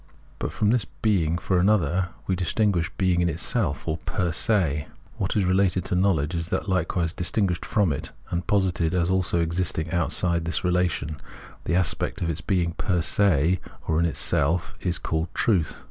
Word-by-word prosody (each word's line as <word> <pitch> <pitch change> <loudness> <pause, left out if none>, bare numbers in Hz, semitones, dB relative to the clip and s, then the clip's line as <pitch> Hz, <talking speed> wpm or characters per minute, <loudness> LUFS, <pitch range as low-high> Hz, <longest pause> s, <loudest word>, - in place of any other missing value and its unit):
But - - -3
from 105 0 +1
this 120 -3 +2 0.2
being 85 -7 +2
for 90 0 0
another 90 -2 +2 0.2
we 95 - 0
distinguish 90 -1 +1
being 90 -2 +2
in 85 - +2
itself 85 - -1
or 80 -1 -1
fer 90 -2 -1
se; 85 -6 +1 0.3
what - - -2
is 100 - +2
related 95 -1 +2
to 95 - -1
knowledge 90 -5 +1
is 85 0 -2
likewise 90 -3 0
distinguished 90 0 0
from 100 -9 +1
it, - - -5 0.2
and 85 0 -2
posited 90 -4 +1
as 90 0 +1
also 90 -2 +1
existing 85 -1 -1
outside 85 -1 +1
this 85 -1 -1
relation; 90 -4 0 0.5
the 85 - 0
aspect 90 -1 +1
of 80 -1 -3
being 90 -4 +1
per 90 0 -1
se 90 -1 +3 0.3
or 80 0 +1
in 85 - +3
itself 85 +1 +1
is 90 -1 0
called 80 +1 -2
Truth. 90 -9 +1
90 Hz, 165 wpm, -25 LUFS, 80-95 Hz, 0.5 s, se